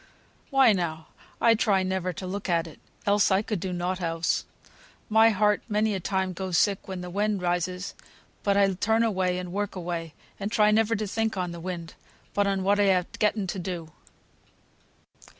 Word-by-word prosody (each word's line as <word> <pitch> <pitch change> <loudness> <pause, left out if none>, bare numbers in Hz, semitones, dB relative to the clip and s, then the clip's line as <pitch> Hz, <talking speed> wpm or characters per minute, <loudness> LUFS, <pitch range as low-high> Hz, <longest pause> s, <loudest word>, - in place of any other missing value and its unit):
Why 270 -5 +5
now, 160 -4 -3 0.3
I 230 - +5
try 200 -3 +2
never 185 -1 -1
to 180 +2 -7
look 195 +1 -4
at 170 -1 +2
it, 160 - -12 0.3
else 205 0 +4
I 195 +1 +3
could 210 -3 -2
do 185 +2 -3
nought 180 +1 -2
else. 165 -1 0 0.6
My 220 +1 +6
heart 210 -1 +2
many 210 0 +1
a 195 - -1
time 190 0 -1
goes 185 -1 -2
sick 200 +2 +1
when 190 -2 -5
the 180 0 -7
wind 205 0 0
rises, 180 +1 -1 0.5
but 200 -1 +2
I 195 -1 +4
turn 220 +5 +2
away 185 -5 +1
and 180 -1 -5
work 205 0 -2
away, 170 -3 -4 0.2
and 205 +1 -3
try 210 -2 +4
never 225 +1 +3
to 215 0 -2
think 220 +1 -1
on 180 -1 -2
the 170 - -7
wind, 170 -1 -6 0.4
but 205 0 +2
on 195 -1 0
what 200 +2 +3
I 195 -2 +4
ha' 180 - -6
getten 210 -1 +1
to 185 +1 -4
do." 170 -3 -5
190 Hz, 190 wpm, -27 LUFS, 180-210 Hz, 0.6 s, My